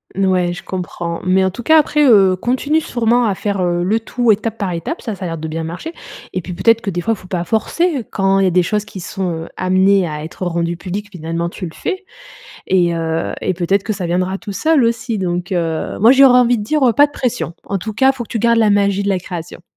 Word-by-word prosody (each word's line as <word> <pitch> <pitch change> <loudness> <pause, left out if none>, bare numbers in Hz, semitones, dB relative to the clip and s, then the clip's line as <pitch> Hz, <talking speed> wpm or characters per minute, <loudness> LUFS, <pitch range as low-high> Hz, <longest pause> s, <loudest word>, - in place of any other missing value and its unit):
N 195 +1 +1
ouais, 180 -2 +1
je 180 - -9
comprends. 175 -2 -5
Mais 185 +1 +3
en 190 - 0
tout 240 +6 -8
cas 315 +5 +6
après, 300 0 +2
heu, 195 -7 +5
continue 260 +10 0
sûrement 240 -2 +1
à 205 -3 0
faire, 200 0 -2
heu, 175 0 0
le 210 +5 +1
tout 235 +1 +1
étape 220 +2 -1
par 200 -4 -2
étape, 170 - -4
ça 220 -4 -4
ça 190 - -6
a - - -2
l'air 165 -1 -4
de 160 0 -5
bien 160 +1 -4
marcher, 175 - -6 0.4
et 185 - -2
puis 180 +1 -7
peut-être 230 +6 +3
que 205 - -3
des 175 -2 -2
fois, 225 +5 0
faut 185 - -14
pas 180 -2 -2
forcer. 265 - 0
Quand 195 0 +2
il - - +3
y - - +4
a - - +1
des 180 +1 +3
choses 210 +4 -1
qui 205 -2 -9
sont, 185 +1 -3
heu, - - -11
amenées 185 0 +3
à 150 -1 -5
être 165 +3 -6
rendues 170 -1 -1
publiques, 200 +4 -5
finalement 170 -1 -3
tu 180 - -7
le 165 - -8
fais 380 -1 -4 0.6
et 175 -2 +2
heu, 165 0 -2
et - - 0
peut-être 190 +3 0
que 220 - -2
ça 195 -3 -4
viendra 185 +2 -1
tout 210 0 -8
seul, 315 +4 +2
aussi, 230 0 -1
donc, 180 -1 -3
heu, 165 -3 -2
moi 225 +4 +7
j'aurais 265 -2 +7
envie 245 -1 +3
de 210 - -4
dire, 300 +6 0
heu: 235 - +3
«Pas 290 +4 +5
de - - -20
pression». 250 - -2
En 200 - -2
tout 215 +4 -5
cas, 265 +5 +4
il - - -14
faut 245 - -4
que - - -16
tu 230 - -2
gardes 235 +1 +3
la 220 -2 +4
magie 200 -1 +2
de 200 - -1
la 190 -2 +1
création. 175 -2 -8
195 Hz, 265 wpm, -17 LUFS, 175-230 Hz, 0.6 s, moi